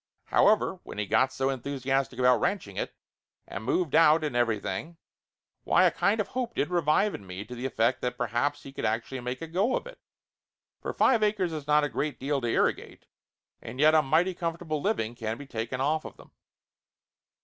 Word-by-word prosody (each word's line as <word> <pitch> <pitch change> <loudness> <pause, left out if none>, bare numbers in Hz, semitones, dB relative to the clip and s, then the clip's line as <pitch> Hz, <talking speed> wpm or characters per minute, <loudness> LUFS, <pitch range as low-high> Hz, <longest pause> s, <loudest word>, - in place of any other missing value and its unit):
However, 205 -3 +3
when - - -10
he 105 - -1
got 115 +6 +2
so 135 0 0
enthusiastic 135 0 -2
about 125 -2 +4
ranching 105 - -1
it, - - -4 0.5
and 110 - -6
moved 170 +6 0
out 160 0 +5
and 150 -5 -2
everything, 120 - -1 0.7
why - - +4
a - - +5
kind 210 +3 +1
of 210 - -1
hope 245 -2 -3
did 145 - 0
revive 175 +4 +2
in 100 - -8
me 95 +3 -6
to 125 - -9
the 125 +2 -3
effect 120 +1 +1
that 125 0 -2
per 125 - 0
haps 130 +6 -1
he 135 - -10
could - - -6
actually 115 +4 -1
make 125 +3 -5
a - - -5
go 195 +10 +1
of - - -7
it, - - -11 0.8
for - - -3
five 240 -4 +3
acres 205 -5 +1
is 150 -2 -6
not 150 0 +4
a - - +2
great 145 -1 -3
deal 140 +1 -1
to 120 - -2
irrigate, 115 - -1 0.6
and 125 +3 -8
yet 155 +2 +6
a 155 - +6
mighty 160 +6 +2
com 170 -2 -3
fortable 155 -4 -3
living 130 - -1
can 115 -1 -4
be 145 - -9
taken 120 0 -4
off 155 +3 +1
of - - -10
them. - - -17
140 Hz, 205 wpm, -28 LUFS, 120-165 Hz, 0.8 s, yet